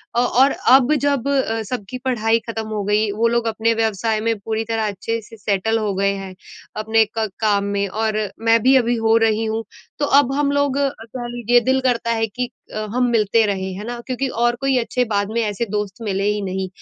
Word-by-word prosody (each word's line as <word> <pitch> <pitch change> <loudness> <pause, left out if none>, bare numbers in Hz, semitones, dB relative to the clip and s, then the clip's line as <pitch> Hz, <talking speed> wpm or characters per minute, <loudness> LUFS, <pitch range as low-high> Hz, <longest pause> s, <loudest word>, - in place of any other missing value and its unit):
अ, - - +3
और 255 +3 +4 0.3
अब 270 +3 +1
जब 280 -2 0
अ, 260 -5 0
सबकी 250 0 -5
पढ़ाई 230 -2 +2
ख़त्म 225 -1 -4
हो 215 -1 -3
गई, 210 +1 +1
वो 225 +3 +1
लोग 235 0 0
अपने 225 +1 +1
व्यवसाय 220 0 0
में 225 0 0
पूरी 220 +2 -2
तरह 225 -1 -1
अच्छे 225 +3 -3
से 225 +1 -14
सेटल 210 +2 0
हो 210 -2 -1
गए 200 +1 +2
हैं, 195 -1 -7 0.4
अपने 220 +1 +3
क 220 - +1
काम 205 -2 +2
में 200 0 0
और 215 +2 -1 0.3
मैं 230 0 +6
भी 265 +1 +5
अभी 240 -1 +2
हो 225 -1 +2
रही 220 0 +2
हूँ। 220 +1 -2 0.4
तो 290 - +2
अब 270 -2 +1
हम 285 0 +1
लोग 285 -1 +1
कह 250 -3 -3
लीजिए 240 +1 +3
दिल 265 +1 +3
करता 235 -2 0
है 225 -1 0
कि 245 +4 -4 0.2
अ, 215 - -3 0.2
हम 250 0 +3
मिलते 225 0 +3
रहें, 190 -2 -2
है 205 - -6
ना? 240 0 -5
क्योंकि 260 +1 -1 0.2
और 240 0 +2
कोई 270 -1 +2
अच्छे 250 +1 0
बाद 200 0 0
में 235 - +1
ऐसे 210 +1 -2
दोस्त 210 0 -3
मिले 200 -3 -2
ही 210 0 -1
नहीं, 190 0 -3
225 Hz, 220 wpm, -20 LUFS, 210-245 Hz, 0.4 s, मैं